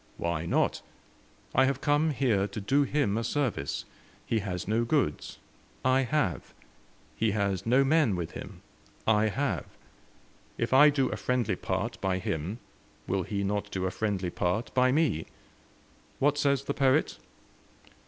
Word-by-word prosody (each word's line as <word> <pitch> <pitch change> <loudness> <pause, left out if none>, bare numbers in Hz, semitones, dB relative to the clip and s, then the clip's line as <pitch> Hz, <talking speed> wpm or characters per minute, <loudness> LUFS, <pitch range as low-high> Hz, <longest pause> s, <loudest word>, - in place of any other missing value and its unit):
"Why 85 -1 -2
not? - - +1 0.7
I 130 - +5
have 135 0 0
come 150 +2 +2
here 120 -9 +1
to 100 +2 -6
do 135 +8 +2
him 140 -6 +1
a - - -3
service. 115 - -2 0.4
He 115 - 0
has 95 -3 -4
no 110 +3 +1
goods. 120 - -1 0.5
I 130 +1 +4
have. 125 - -1 0.6
He 110 -2 +1
has 100 -2 -1
no 130 +4 +5
men 140 - +3
with 85 -2 -4
him. - - -9 0.4
I 110 0 +3
have. 105 - -1 0.9
If 115 +2 -1
I 145 +3 +8
do 140 -2 +1
a - - -3
friendly 125 -3 0
part - - -3
by 95 -1 0
him, 90 +3 -3 0.5
will 95 0 0
he 100 +2 -3
not 105 +1 -2
do 95 -2 -3
a 95 - -1
friendly 100 -5 -2
part 90 +8 -1
by 130 0 +4
me? 145 - +1 0.9
What 145 +1 +2
says 140 -2 +1
the 140 - -2
poet? 135 +2 +2
115 Hz, 155 wpm, -28 LUFS, 95-135 Hz, 0.9 s, I